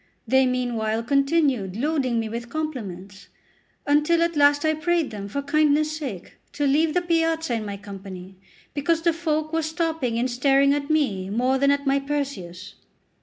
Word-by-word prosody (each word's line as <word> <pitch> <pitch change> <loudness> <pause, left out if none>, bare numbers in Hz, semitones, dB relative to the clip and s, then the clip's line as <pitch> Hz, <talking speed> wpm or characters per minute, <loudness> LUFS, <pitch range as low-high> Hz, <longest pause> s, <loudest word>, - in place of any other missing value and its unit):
They 265 0 +4
meanwhile 230 -3 -1
continued 275 - +1
loading 260 -3 0
me 225 - -2
with 235 +2 -6
compliments, 205 - -6 0.6
until 300 +4 +3
at 335 -1 -1
last 290 +1 +4
I 315 - +3
prayed 330 -1 0
them, 200 -2 -6
for 280 +8 -4
kindness' 305 +1 +2
sake, 255 - -7 0.2
to 290 - -1
leave 305 +4 +2
the 355 - +2
piazza 325 -4 0
in 220 -2 -2
my 200 0 -5
company, 195 -2 -10 0.4
because 320 +3 0
the 335 -1 +3
folk 310 -1 -2
were 325 - +1
stopping 315 -6 -2
and 240 +2 +1
staring 275 +3 +3
at 290 0 -3
me 215 -12 0
more 250 +5 +1
than 280 +1 +3
at 280 0 +1
my 275 0 +2
Perseus. 270 -11 -5
280 Hz, 170 wpm, -24 LUFS, 230-310 Hz, 0.6 s, They